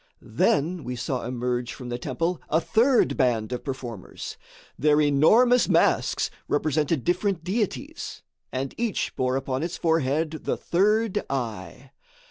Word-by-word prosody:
Then 175 -5 +1
we 125 - -4
saw 125 +1 -3
emerge 125 0 -2
from 125 -2 -8
the 120 0 -3
temple 165 +7 -2
a 160 - +3
third 235 +9 +3
band 120 -5 +1
of 125 - -4
performers. 125 -8 -6 0.4
Their 150 +1 +3
enormous 215 - +5
masks - - +2 0.2
represented 150 -1 0
different 180 0 0
deities, 205 +3 -3 0.3
and 130 +1 -3
each 230 -4 -1
bore 130 0 0
upon 135 0 -2
its 170 +2 -3
forehead 160 0 0
"the - - 0
third 210 +4 +1
eye." 120 -1 -5
145 Hz, 130 wpm, -25 LUFS, 125-175 Hz, 0.4 s, enormous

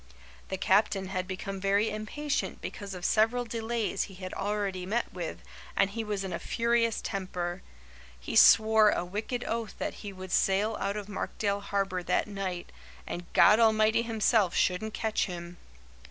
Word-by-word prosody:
The 190 - -2
captain 195 0 +2
had 185 -1 -3
become 190 +1 -5
very 200 +3 +2
impatient 280 +8 -3
because 200 -2 -6
of 180 - -6
several 225 +3 +2
delays 230 -1 -2
he 195 - -13
had 185 0 -7
already 200 -2 -2
met 220 +6 -2
with, 175 -2 -5 0.3
and 195 - +3
he 225 +2 -3
was 205 -2 -3
in 190 -2 -4
a - - -3
furious 230 -1 +1
temper. 180 -2 -3 0.6
He - - -5
swore 220 -1 +7
a 175 - 0
wicked 215 +6 -3
oath 230 -1 -3
that - - -3
he 205 - -6
would 185 -1 -9
sail 200 +4 +2
out 200 +1 -1
of 205 -1 -5
Markdale 205 0 -2
Harbour 195 -2 -1
that - - +1
night 195 -3 -5 0.3
and 175 0 -6
'God 210 +2 +7
Almighty 220 0 +4
Himself 220 -4 +2
shouldn't 210 +4 +1
catch 220 -2 0
him. 175 -1 -7
200 Hz, 165 wpm, -29 LUFS, 185-220 Hz, 0.6 s, swore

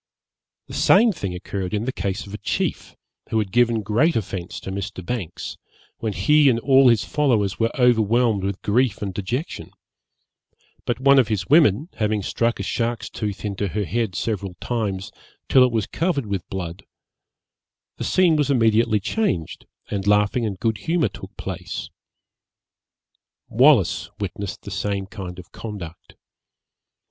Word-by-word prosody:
The - - -11
same 230 0 +5
thing 100 - -4
occurred 95 +2 -4
in 105 +2 -2
the 130 - -1
case 100 +1 -3
of 100 - -11
a 105 - -5
chief, - - -2 0.3
who 110 - 0
had 105 -3 -1
given 115 -1 +2
great 120 - +2
offence 95 -4 -4
to 95 - -6
Mr. 95 -1 -5
Banks, 100 -8 -5 0.4
when 110 -2 -2
he 150 +2 +4
and 115 -2 +2
all 135 0 +5
his 115 -5 +3
followers 115 -10 +1
were 115 0 +2
overwhelmed 115 -3 +3
with 100 0 -3
grief 115 0 +1
and 100 -2 -3
dejection; 120 - -4 1.2
but 120 -1 0
one 140 +1 +6
of 125 - +3
his 105 -4 -1
women, 150 - +5
having 105 -2 0
struck 115 +4 0
a - - -2
shark's 120 0 -2
tooth 105 -1 -4
into 100 0 -2
her 105 +3 -2
head 105 +1 -1
several 95 +1 -3
times, 100 -5 -3 0.4
till 130 - +6
it 125 - +3
was 110 -3 0
covered 165 -6 -1
with 100 -4 -4
blood, 90 -1 -5 1.1
the - - -4
scene 180 -3 +3
was 145 -2 +1
immediately 115 -3 +3
changed, 100 - -2 0.2
and 100 -1 -2
laughing 105 +3 +3
and 100 -3 -5
good 110 -3 0
humour 160 -4 +1
took - - -11
place. - - -6 1.6
Wallis 115 - +4
witnessed 100 -1 -5
the 100 - -8
same 100 +1 -2
kind 95 -3 -8
of 90 - -12
conduct. 95 -7 -9
105 Hz, 155 wpm, -22 LUFS, 100-125 Hz, 1.6 s, one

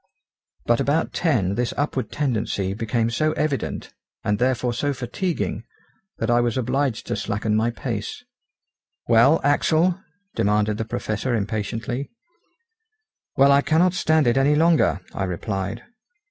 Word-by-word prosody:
But 120 0 +2
about 155 +4 0
ten 115 - +1
this 120 +3 -2
upward 140 -3 -2
tendency 110 -8 -1
became 115 +2 -1
so 155 +6 +1
evident, 150 -4 -2 0.3
and 105 0 0
therefore 125 -1 +1
so 145 +4 -1
fatiguing, 130 - -3 0.5
that 115 +1 -1
I 120 0 +4
was 120 -1 0
obliged 130 0 -1
to - - -2
slacken 105 +1 -1
my 110 +2 +2
pace. 120 - -5 0.8
"Well, 120 +7 +5
Axel?" 160 +5 +2 0.3
demanded 105 -1 +1
the 115 - -1
Professor 110 +3 -2
impatiently. 110 +5 -3 1.3
"Well, 140 +1 +6
I 140 0 +5
cannot 170 +5 +3
stand 160 -4 +2
it 120 +1 +2
any 140 +2 +4
longer," 160 - +3
I 95 - -2
replied. 95 +4 -4
120 Hz, 130 wpm, -23 LUFS, 110-145 Hz, 1.3 s, Well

